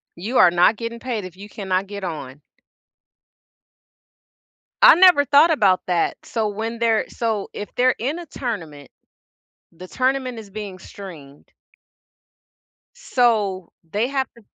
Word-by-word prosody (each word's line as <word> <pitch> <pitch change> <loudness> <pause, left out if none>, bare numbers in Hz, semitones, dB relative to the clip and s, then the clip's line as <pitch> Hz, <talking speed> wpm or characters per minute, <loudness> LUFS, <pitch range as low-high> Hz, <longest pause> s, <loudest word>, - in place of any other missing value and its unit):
You 220 +9 -3
are 175 - +7
not 175 +5 +4
getting 230 +1 -6
paid 230 -5 -4
if 185 0 -11
you 205 +2 -11
cannot 190 -2 -2
get 200 0 -8
on. 145 -5 -6 2.4
I - - +9
never 355 -5 +6
thought 290 +5 +5
about 195 - +3
that. 175 -2 0
So 225 -2 -2
when 225 +3 -4
they're 225 -2 +2
so 220 -4 -3
if 205 - -7
they're 255 +1 +3
in 280 +9 -2
a 345 - -8
tournament, 170 - -6 0.8
the 180 +2 -12
tournament 255 0 -1
is 210 -3 -11
being 200 -2 -7
streamed 160 -8 -12 1.4
so, 220 - 0 0.2
they 215 +4 0
have 270 -1 -1
to 235 - -17
215 Hz, 135 wpm, -21 LUFS, 185-255 Hz, 2.4 s, I